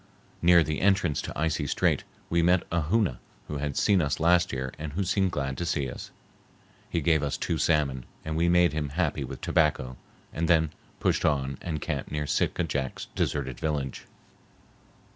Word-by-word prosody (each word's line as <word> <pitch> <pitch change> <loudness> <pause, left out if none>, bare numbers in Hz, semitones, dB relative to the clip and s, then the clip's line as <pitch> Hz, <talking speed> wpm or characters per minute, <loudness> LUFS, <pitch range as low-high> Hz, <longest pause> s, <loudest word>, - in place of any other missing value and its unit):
Near 85 -1 +6
the 75 0 -2
entrance 95 -6 +2
to - - -6
Icy 80 -2 0
Strait - - +1 0.2
we 85 0 +2
met 90 +1 +4
a 85 0 +1
Hoona 100 - +2 0.3
who 75 - -4
had 70 -1 -3
seen 100 -3 +4
us 70 -3 -1
last 85 +2 +4
year 65 -1 -3
and 75 -1 -5
who 100 +5 0
seemed 95 +1 +1
glad 70 -3 -3
to - - -1
see 70 -5 0
us. - - -8 0.8
He 85 - -1
gave 80 0 +3
us 70 -2 -1
two 80 - -1
salmon, 70 -5 +1 0.2
and 80 0 -3
we 85 +2 +2
made 90 -2 +4
him 75 -2 -2
happy 75 -2 -1
with 65 0 -7
tobacco 65 -5 +1 0.4
and 85 +1 -1
then 80 -3 +3 0.3
pushed - - +1
on 70 -3 0
and 80 -3 -3
camped - - -3
near 75 0 -2
Sitka 85 - 0
Jack's 70 -5 -3
deserted 65 -4 -2
village. 70 -4 -3
80 Hz, 180 wpm, -27 LUFS, 70-85 Hz, 0.8 s, Near